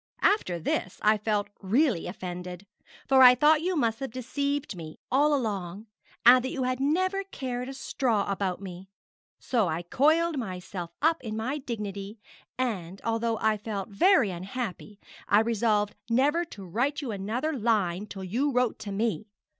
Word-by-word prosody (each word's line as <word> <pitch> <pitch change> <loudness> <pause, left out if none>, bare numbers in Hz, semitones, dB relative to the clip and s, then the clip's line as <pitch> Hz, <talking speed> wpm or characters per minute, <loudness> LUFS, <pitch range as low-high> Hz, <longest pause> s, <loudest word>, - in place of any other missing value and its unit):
After 405 - +2
this 175 +2 -2
I 215 0 +4
felt 210 -1 -1
really 220 - +1
offended; 180 0 -6 0.4
for 265 -1 +5
I 250 -1 +10
thought 300 +4 +4
you 365 +2 0
must 230 -6 +1
have 270 - -4
deceived 280 +2 -3
me 160 -3 -9
all 290 +4 +4
along, 205 -7 -2 0.4
and 250 +1 +8
that 260 - -2
you 265 -1 -3
had 255 0 -1
never 370 +8 +1
cared 255 -7 -5
a - - -6
straw 235 -6 0
about 195 -2 -1
me; 190 -1 -9 0.5
so 230 -7 0
I 165 +1 -2
coiled 310 - +2
myself 180 -4 -5
up 320 -3 +2
in 220 -2 -4
my 260 +7 -2
dignity, 210 -5 -5 0.4
and, 195 -8 -3
although 230 0 0
I 220 0 +1
felt 205 -2 -5
very 245 - +4
unhappy, 200 +2 -6 0.3
I 205 - +6
resolved 215 -2 +1 0.2
never 290 +8 +2
to 200 - -11
write 250 - -1
you 250 - -3
another 220 +10 -2
line 210 - 0
till 195 -1 -7
you 245 +10 0
wrote 250 -3 +1
to 215 -2 -6
me. 220 +2 -1
225 Hz, 160 wpm, -27 LUFS, 195-265 Hz, 0.5 s, I